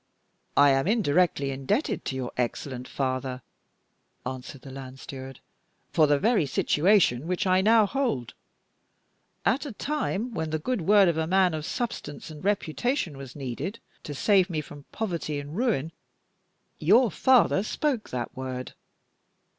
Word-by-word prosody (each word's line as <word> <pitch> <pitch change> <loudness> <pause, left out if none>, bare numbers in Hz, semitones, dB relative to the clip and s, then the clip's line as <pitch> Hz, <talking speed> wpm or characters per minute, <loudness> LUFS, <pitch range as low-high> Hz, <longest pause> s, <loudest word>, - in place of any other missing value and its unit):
"I 145 0 +7
am 135 +3 +2
indirectly 180 -9 +2
indebted 135 - -1
to 130 - -3
your 130 -2 -3
excellent 125 +1 -3
father," 130 -1 -3 0.8
answered 130 +1 -6
the 135 - -9
land 135 0 -9
steward, 135 -1 -9 0.5
"for 155 -2 +4
the 145 0 +4
very 210 -3 +2
situation 155 - +3
which 180 +3 -1
I 185 0 +4
now 220 +2 +5
hold. 205 - -1 1.1
At 265 - +2
a - - -5
time 250 -3 -2
when 160 -4 -2
the 155 - 0
good 230 +7 -2
word 200 +3 +5
of 170 -2 +1
a 160 - 0
man 185 -1 +3
of 155 +1 -4
substance 185 -11 -4
and 155 +1 -10
reputation 205 - 0
was 135 -2 -9
needed 140 - -4 0.2
to 145 - -7
save 195 +4 +3
me 160 -3 -1
from 145 -1 -9
poverty 170 -8 -3
and 145 +2 -8
ruin, 195 - 0 0.9
your 215 +8 +5
father 250 -2 +4
spoke 250 +2 -1
that 120 -2 -4
word. 130 -1 -5
155 Hz, 145 wpm, -27 LUFS, 135-205 Hz, 1.1 s, I